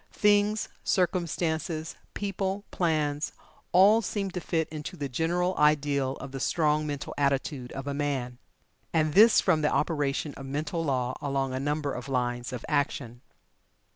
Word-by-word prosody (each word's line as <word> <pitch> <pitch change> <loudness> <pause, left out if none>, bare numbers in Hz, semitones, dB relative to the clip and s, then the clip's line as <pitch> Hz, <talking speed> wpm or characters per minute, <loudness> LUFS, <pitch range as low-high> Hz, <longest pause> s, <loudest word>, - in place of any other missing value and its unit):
Things, 210 0 +3 0.2
circumstances, 170 -2 -1 0.2
people, 195 0 -2
plans, 155 -4 0 0.4
all 205 +5 +6
seem 200 -2 -2
to 180 - -3
fit 160 -2 0
into 155 +4 -6
the 145 -2 -3
general 175 +7 0
ideal 145 -3 +2
of 135 - -8
the 135 - -5
strong 150 +1 +1
mental 145 -2 -4
attitude 140 -2 0
of 135 - -5
a 140 - -2
man. 135 -4 -2 0.5
And 155 -2 +1
this 215 +3 +7
from 165 -5 +2
the 150 - +2
operation 145 -2 0
of 135 - -9
mental 150 +4 -2
law 130 -4 0
along 135 -2 -1
a 130 - -2
number 145 0 -1
of 125 +2 -6
lines 120 -1 -1
of 125 -2 -6
action. 125 -4 -1
150 Hz, 150 wpm, -28 LUFS, 135-175 Hz, 0.5 s, this